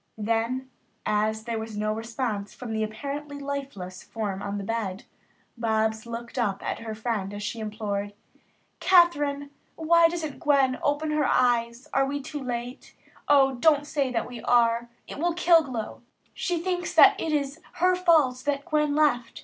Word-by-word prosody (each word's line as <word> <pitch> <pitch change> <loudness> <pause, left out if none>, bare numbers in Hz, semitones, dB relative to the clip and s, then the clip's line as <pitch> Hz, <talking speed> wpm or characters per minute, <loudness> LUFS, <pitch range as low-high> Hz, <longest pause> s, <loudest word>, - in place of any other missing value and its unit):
Then, 230 +4 -1 0.3
as 215 +1 0
there 230 -1 -3
was 220 -1 -6
no 215 0 0
response 225 -2 -4
from 240 -3 -6
the 220 - -1
apparently 285 +7 -5
lifeless 275 -10 -6
form 205 -4 -4
on 200 0 -3
the 200 - -4
bed, 210 -1 -3 0.5
Bobs 220 -1 0
looked 235 +2 -6
up 205 -5 -1
at - - -3
her 220 -1 -6
friend 215 -3 -2
as 205 - -6
she 225 +2 -4
implored: 210 -2 -3 0.7
"Kathryn, 290 -6 +3 0.2
why 335 +1 +5
doesn't 325 -4 -4
Gwen 270 -3 +2
open 290 +2 0
her 300 -2 +1
eyes? 235 0 +1
Are 270 0 +3
we 285 +1 -2
too 295 +1 -6
late? 245 0 -6 0.3
O, 270 -2 +5
don't 290 +3 +3
say 280 -3 -1
that 230 -2 -1
we 245 -2 -8
are. 235 -1 +2 0.2
It - - -8
will 345 +2 +1
kill 345 -1 +5
Glow. 250 -7 -6 0.3
She 355 -1 -1
thinks 355 +1 -2
that - - +8
it 320 - -1
is 285 0 -1
her 365 +1 +3
fault 315 -9 +3
that 285 -1 -1
Gwen 300 -3 +1
left. 245 -6 +1
250 Hz, 165 wpm, -26 LUFS, 220-290 Hz, 0.7 s, that